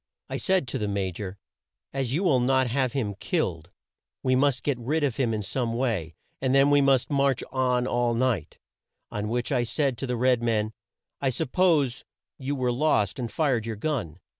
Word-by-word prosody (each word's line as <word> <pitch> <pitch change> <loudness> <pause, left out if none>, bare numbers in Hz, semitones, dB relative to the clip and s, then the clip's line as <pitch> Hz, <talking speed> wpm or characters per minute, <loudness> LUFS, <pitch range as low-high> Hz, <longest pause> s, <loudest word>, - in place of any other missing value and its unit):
I - - -2
said 185 -7 +1
to - - -3
the 105 - -1
Ma 100 -2 -1
jor; 95 +2 -6 0.6
'As 135 -3 -1
you 165 +8 0
will 150 -9 +4
not 130 +1 +3
have 125 0 0
him 110 -7 -1
killed, 95 - -2 0.5
we 130 -1 +3
must 135 -1 +2
get 140 -4 0
rid 150 +6 0
of 135 -5 0
him 125 -4 +1
in 110 -1 -2
some 115 +3 -2
way, 105 -11 -1 0.3
and 130 0 +2
then 140 +1 +5
we 145 0 +5
must 135 0 +3
march 140 -2 +2
on 125 -1 +1
all 120 -2 +1
night;' 115 - 0 0.5
on 105 0 -3
which 120 +3 -1
I 125 -3 +2
said 130 0 -1
to 135 - -3
the 125 -1 -1
red 125 0 +3
man, 110 -2 0 0.5
'I 135 - +2
suppose 145 -1 +1 0.4
you 140 +1 -2
were 125 -2 0
lost 120 -6 +1
and 120 -3 -3
fired 120 -3 +1
your 115 - -3
gun.' 105 - -3
125 Hz, 195 wpm, -26 LUFS, 115-135 Hz, 0.6 s, then